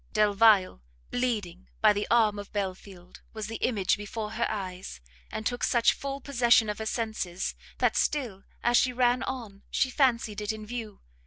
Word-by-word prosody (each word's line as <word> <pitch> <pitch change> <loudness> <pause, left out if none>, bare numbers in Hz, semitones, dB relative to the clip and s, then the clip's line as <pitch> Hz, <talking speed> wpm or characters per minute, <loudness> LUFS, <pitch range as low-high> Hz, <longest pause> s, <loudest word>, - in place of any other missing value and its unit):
Delvile, 210 - +4 0.3
bleeding 210 -8 -2
by 215 -1 +5
the 205 0 -2
arm 215 -3 +3
of 205 - -9
Belfield, 190 -2 -6
was 220 -1 -5
the 225 +1 -5
image 205 -7 +1
before 210 +1 -5
her 235 +1 0
eyes, 185 - -5 0.3
and 220 - -5
took 245 +1 -2
such 235 -2 +4
full 275 0 -5
possession 245 -5 +3
of 210 - -8
her 220 - -3
senses, 220 -6 -2 0.2
that - - +2
still, 235 -10 -1 0.2
as 240 0 +4
she 255 - +3
ran 245 0 +2
on, 225 -7 -5
she 260 - +1
fancied 230 -6 +1
it 210 - -1
in 215 -1 -7
view. 220 -2 -7
220 Hz, 170 wpm, -28 LUFS, 205-240 Hz, 0.3 s, by